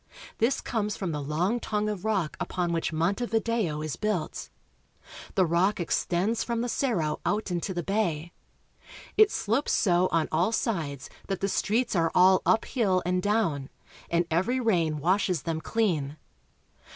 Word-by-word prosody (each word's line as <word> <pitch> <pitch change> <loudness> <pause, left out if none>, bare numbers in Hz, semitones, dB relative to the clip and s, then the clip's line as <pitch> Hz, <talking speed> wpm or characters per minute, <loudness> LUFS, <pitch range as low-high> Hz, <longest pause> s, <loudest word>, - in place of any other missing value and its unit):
This 235 +5 +2
comes 210 -3 -2
from 185 -4 -3
the 150 -1 -3
long 170 +11 0
tongue 210 -2 -1
of 210 -4 -3
rock 195 -8 0
upon 175 -2 -2
which 165 0 -1
Montevideo 200 -1 0
is 155 -3 -4
built. 210 -6 -2 0.9
The 190 -2 +4
rock 180 +6 +2
extends 180 +5 0
from 235 -1 -2
the 245 - -2
Cerro 175 - 0
out 210 -2 -1
into 175 +2 -2
the 175 -2 -3
bay. 175 -5 -1 0.8
It 430 -1 +6
slopes 235 - 0
so 180 -2 +3
on 165 -2 +2
all 175 +7 +2
sides 160 - -2 0.2
that 195 - -2
the 195 - 0
streets 225 +4 0
are 165 -2 +2
all 185 +1 +6
up 225 - +3
hill 195 -8 +1
and 180 0 +1
down, 185 -10 0 0.4
and 170 0 +2
every 190 +11 +1
rain 170 -10 +1
washes 180 +1 +1
them 160 -1 -2
clean. 160 -9 -1
185 Hz, 155 wpm, -27 LUFS, 165-220 Hz, 0.9 s, It